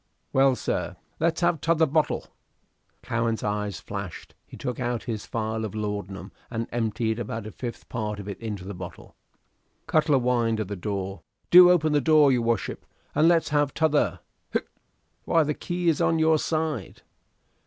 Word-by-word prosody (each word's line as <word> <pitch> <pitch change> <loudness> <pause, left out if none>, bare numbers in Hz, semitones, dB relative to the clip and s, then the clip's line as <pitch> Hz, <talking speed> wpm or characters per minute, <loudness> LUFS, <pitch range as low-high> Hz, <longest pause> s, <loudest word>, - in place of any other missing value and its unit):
"Well, 135 0 +5
sir?" - - -2 0.2
"Let's 165 +1 +1
have 175 -4 +2
t'other 165 -1 +3
bo'l." 155 +1 0 0.8
Cowen's 115 0 -1
eyes 105 -1 -2
flashed; 100 -3 -7
he - - -11
took 125 -2 -4
out 120 -2 -2
his 110 -4 -5
phial 110 0 -2
of 110 -1 -5
laudanum 100 -2 -4 0.2
and 115 -1 -3
emptied 115 -1 -1
about 115 -1 -4
a 110 - -6
fifth 120 +1 -7
part 105 -3 -3
of 100 - -8
it 100 - -6
into 105 -5 -5
the 100 - -5
bottle. 90 -1 -10 0.7
Cutler 155 -2 +3
whined 120 -3 +1
at 105 -3 -3
the 100 - -3
door, 95 0 -4 0.3
"Do 180 0 +10
open 155 -4 +3
the 145 - +3
door, 150 -1 +5
your 125 -2 +2
wuship, 115 0 -1 0.3
and 155 - +4
let's 170 -1 +3
have 145 -2 +1
t'other 155 -2 +2 0.3
(hic)." - - -1 0.6
"Why, 165 -1 +4
the 150 0 -1
key 175 +3 -3
is 160 -3 +3
on 165 - +3
your 160 0 +4
side." 155 - -2
120 Hz, 170 wpm, -26 LUFS, 105-155 Hz, 0.8 s, Do